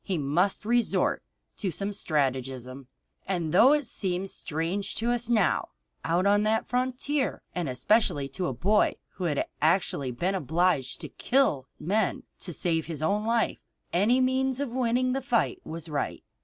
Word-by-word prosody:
He 190 -3 -2
must 170 +9 +1
resort 240 +1 +2 0.4
to 200 - -2
some 200 +5 -3
stratagem, 135 - -2 0.4
and 170 -4 -1
though 250 +10 +7
it 295 -2 +1
seems 190 -3 -2
strange 165 +6 -2
to 235 +2 0
us 240 -1 0
now, 215 -6 +2 0.4
out 175 +3 +1
on 205 +1 +4
that 220 +1 +1
frontier, 255 +3 -1
and 175 -5 -2
especially 145 - +2
to 175 +6 -3
a - - -1
boy 200 - +2 0.2
who 185 - -2
had 150 -4 0 0.2
actually 155 -4 +2
been 170 +11 -1
obliged 170 -5 +1
to - - -5
kill 240 - +1
men 195 +5 0 0.2
to 180 - -5
save 165 -1 -1
his 155 -3 -4
own 210 +6 +1
life, 230 0 +1 0.3
any 215 +8 +3
means 260 0 +1
of 285 -2 -1
winning 250 +1 +1
the 270 - -1
fight 245 -3 0
was 165 0 -7
right. 150 -3 -3
190 Hz, 160 wpm, -27 LUFS, 155-235 Hz, 0.4 s, though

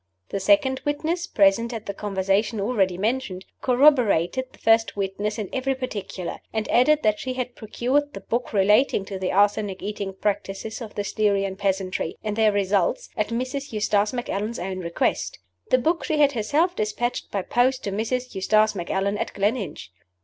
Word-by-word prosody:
The 195 - -2
second 265 +3 +3
witness, 320 +4 -1
present 205 +4 +3
at 225 -2 -6
the 200 - -4
conversation 200 +2 0
already 195 -4 +1
mentioned, 210 -3 -2 0.2
corroborated 250 - +3
the - - -19
first 225 -1 +3
witness 200 +2 -2
in 210 -3 -3
every 270 +1 0
particular; 205 -8 -5
and 220 -1 -2
added 300 +5 +4
that 215 -1 +2
she 255 - -3
had 250 -1 -4
procured 260 +6 -1
the - - -7
book 240 +2 -2
relating 210 +1 +3
to 195 -1 -6
the 185 - -1
arsenic 205 -1 +1
eating 200 -2 -4
practices 205 +2 -3
of 220 -3 -8
the 205 - -1
Styrian 200 -1 0
peasantry, 190 -3 -2
and 210 -1 -2
their 220 -1 +4
results, 200 -2 0
at 215 - 0
Mrs. 255 +5 -3
Eustace 210 -1 +1
Macallan's 235 -2 -3
own 185 +1 -4
request. 170 -2 -1 0.3
This 255 - +4
book 330 +5 +1
she 310 - 0
had 290 -2 +5
herself 290 - +1
dispatched 240 +3 -2
by 200 -2 -2
post 255 +4 +1
to 200 - -2
Mrs. 245 +5 -2
Eustace 215 +3 +3
Macallan 195 +2 -1
at - - -2
Gleninch. 200 - -2
215 Hz, 170 wpm, -24 LUFS, 195-255 Hz, 0.3 s, had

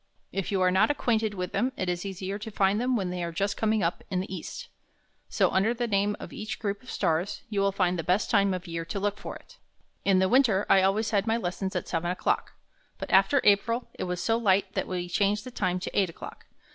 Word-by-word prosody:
If 195 0 -3
you 195 -2 +1
are 185 - +4
not 190 +4 +4
acquainted 225 -7 0
with 180 -1 -3
them, 250 +6 0
it 185 - -2
is 180 +2 -2
easier 195 +1 -4
to 215 - -6
find 200 +1 +2
them 250 +1 +1
when 190 -5 -1
they 180 -1 -3
are 170 - -3
just 200 +4 -1
coming 220 -1 +1
up 165 - -1
in 185 -2 0
the 190 +1 -4
east. 170 - -7 0.6
So - - +2
under 205 +5 +2
the 240 0 -1
name 205 -1 +1
of - - -9
each 215 - -5
group 200 -2 -3
of 250 - -14
stars, 170 +1 -1
you 200 -2 +1
will 200 0 +2
find 185 -2 0
the - - -2
best 185 +5 +1
time 200 -3 +4
of 180 0 -6
year 165 -1 -4
to 180 +4 -4
look 205 +1 -1
for - - -6
it. - - -15 0.4
In 195 -1 +4
the 190 0 +3
winter, 225 -4 +3
I 195 - +7
always 200 +4 +1
had 205 0 +1
my 225 +1 +2
lessons 190 -2 -3
at - - -2
seven 175 0 -1
o'clock, 180 - -1 0.4
but - - -6
after 280 -2 +5
April 230 +4 +2
it - - -4
was 180 0 -3
so 225 +4 +1
light 195 -3 +2
that - - -2
we 180 -1 -3
changed 205 +3 +1
the 255 - -8
time 185 -5 -1
to - - -5
eight 195 -3 +3
o'clock. 165 - -10
195 Hz, 245 wpm, -27 LUFS, 185-215 Hz, 0.6 s, I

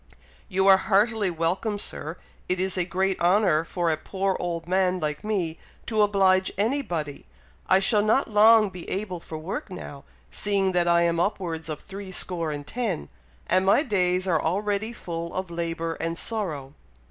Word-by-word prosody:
"You 190 +1 +1
are 195 -1 +8
heartily 210 +1 +2
welcome, 175 +6 -1
Sir! 160 -4 -4 0.3
It 180 0 0
is 190 0 0
a 180 -2 +1
great 190 +2 -1
honour 175 -3 +3
for 170 0 -1
a 155 - 0
poor 190 +3 -2
old 170 -1 -3
man 185 0 +1
like 150 -3 -3
me 185 -7 -2 0.3
to 220 -2 +1
oblige 190 -2 +3
anybody. 195 - -2 0.4
I 190 - +6
shall 205 +2 +3
not 220 +6 +2
long 215 -1 +5
be 180 -2 -8
able 190 -3 -3
for 160 -1 -8
work 165 +6 -5
now, 145 -6 -8 0.3
seeing 200 -2 +2
that 175 -1 +1
I 170 0 +4
am 170 -1 +1
upwards 170 -4 -2
of 150 -1 -5
threescore 185 -4 -2
and 145 -1 -5
ten, 220 - -3 0.4
and 185 +1 +2
my 200 +9 +4
days 185 - +1
are 165 -4 +2
already 205 +5 -1
full 170 -6 -6
of 185 -2 -4
labour 165 -1 -3
and 165 0 -2
sorrow." 160 -13 -3
185 Hz, 170 wpm, -25 LUFS, 170-200 Hz, 0.4 s, are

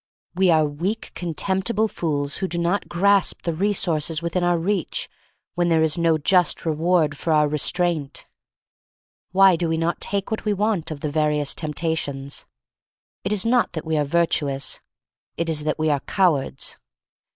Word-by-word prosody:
We 185 +1 +3
are 160 -2 +4
weak, 170 +10 -3
contemptible 190 +6 0
fools 145 -7 -2
who 190 - -2
do 175 - -4
not 170 +4 0
grasp 200 +2 +2
the 170 - -1
resources 165 -4 0
within 170 +1 -2
our 175 0 +2
reach 185 0 -2 0.5
when 175 -1 +1
there 160 -1 +3
is 155 -2 +3
no 165 -2 +2
just 180 +4 +2
reward 160 -1 +1
for 165 - -2
our 150 -1 +4
re 150 +1 -2
straint. 170 -4 0 1.1
Why 190 0 +6
do 165 0 -1
we 160 - 0
not 165 +1 -1
take 200 +1 -2
what 220 - -2
we 210 - +1
want 200 -5 0
of 150 -3 -6
the 150 - -2
various 150 -1 +1
temptations? 150 -3 -3 0.8
It - - -2
is 210 -1 +1
not 240 +1 +2
that 160 -1 -5
we 160 0 -1
are 150 - +2
virtuous. 145 -3 0 0.6
It 170 0 -1
is 150 -2 -1
that 155 - 0
we 155 -1 +1
are 145 - +1
cowards. 150 -5 0
165 Hz, 170 wpm, -23 LUFS, 150-185 Hz, 1.1 s, Why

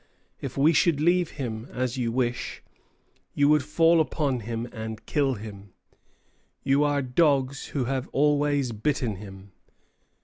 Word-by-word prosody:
If 135 -1 -6
we 150 +4 +4
should 160 -1 +3
leave 175 +2 +2
him, 115 -4 -4
as 125 0 -2
you 120 -3 -1
wish, 125 0 -2 0.7
you 145 - +4
would 150 -1 +5
fall 165 +3 +4
upon 145 -4 -1
him 115 +1 -4
and 110 -1 -7
kill 140 -3 +1
him. 100 -3 -10 0.9
You 140 +2 +3
are 145 -1 +1
dogs 135 0 +1
who 135 -4 -2
have 130 +1 -2
always 145 -2 +2
bitten 115 -2 -1
him. 95 0 -11
135 Hz, 140 wpm, -26 LUFS, 115-145 Hz, 0.9 s, would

